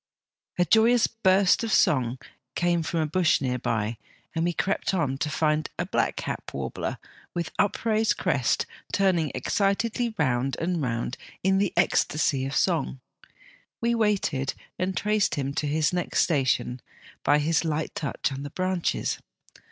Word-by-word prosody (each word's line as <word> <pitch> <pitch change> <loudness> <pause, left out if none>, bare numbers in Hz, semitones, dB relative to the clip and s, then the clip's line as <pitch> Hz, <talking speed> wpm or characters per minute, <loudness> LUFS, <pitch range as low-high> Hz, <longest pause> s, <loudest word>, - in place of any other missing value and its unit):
" - - -44
A 180 - +3
joyous 225 +6 +5
burst 195 -2 +3
of 225 - -2
song 130 - +3 0.4
came 175 -1 +2
from 165 0 -1
a - - +1
bush 170 +2 +2
near 125 -2 -1
by, 110 -1 -1 0.3
and 165 - 0
we 175 - +2
crept 190 +2 -1
on, 145 -7 0
to 150 - -1
find 155 0 +1
a - - -1
blackcap - - -2
warbler 65 -2 -4 0.4
with 170 -2 -2
upraised 220 +2 +2
crest - - +1 0.3
turning 180 -7 +2
excitedly 220 - 0
round 130 -3 0
and 170 0 -1
round 120 -1 -2 0.3
in 190 +1 +3
the 200 -2 +1
ecstasy 150 -5 +2
of 135 - -4
song. 160 -7 +1 0.8
We 235 0 +1
waited, 200 - 0 0.2
and 185 +1 -1
traced 210 0 +1
him 140 -1 -2
to 150 - -1
his 150 +3 +1
next 180 -1 +1
station 130 -5 0 0.4
by 145 - +4
his 155 +3 +1
light 155 -1 -2
touch 145 -1 -2
on 135 0 -5
the 145 - -5
branches. 185 +2 -1
165 Hz, 150 wpm, -26 LUFS, 140-190 Hz, 0.8 s, joyous